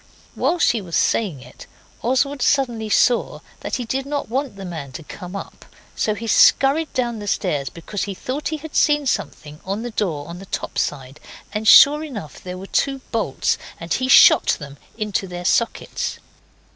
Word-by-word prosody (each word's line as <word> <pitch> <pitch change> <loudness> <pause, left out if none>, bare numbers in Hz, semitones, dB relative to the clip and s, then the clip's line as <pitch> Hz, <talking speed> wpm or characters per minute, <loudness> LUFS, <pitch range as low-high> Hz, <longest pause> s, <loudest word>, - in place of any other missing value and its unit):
While 355 - 0
she 235 -9 +2
was 175 -3 -6
saying 175 - 0
it - - -14 0.3
Oswald 275 +3 0
suddenly 240 -6 +1
saw 240 +3 +2 0.2
that - - -3
he 250 - -3
did 270 +4 -3
not 285 -4 -3
want 260 -1 -2
the 195 -1 -8
man 160 -6 -6
to 160 - -8
come 180 +5 -9
up. 195 - -8 0.3
So 215 - 0
he 230 - -7
scurried 275 +7 +4
down 240 -3 -1
the 205 - -7
stairs 140 -8 -1
because 175 - -5
he 200 -2 -5
thought 260 +9 -4
he 315 - -2
had 305 0 -10
seen 295 -1 +3
something 150 - -3
on 200 +4 -3
the 240 - -5
door 160 -9 -2
on 170 +1 -8
the 195 - -11
top - - -4
side, 135 0 -3 0.3
and 215 0 -2
sure 295 +6 +8
enough 215 - -8
there 180 0 -7
were 190 - -8
two 270 +6 -1
bolts, 215 - 0 0.2
and 165 -1 -3
he 255 - 0
shot 260 - +7
them 140 -2 -10 0.2
into 210 -3 -2
their 175 0 -7
sockets. 235 +5 -1
215 Hz, 185 wpm, -21 LUFS, 175-265 Hz, 0.3 s, sure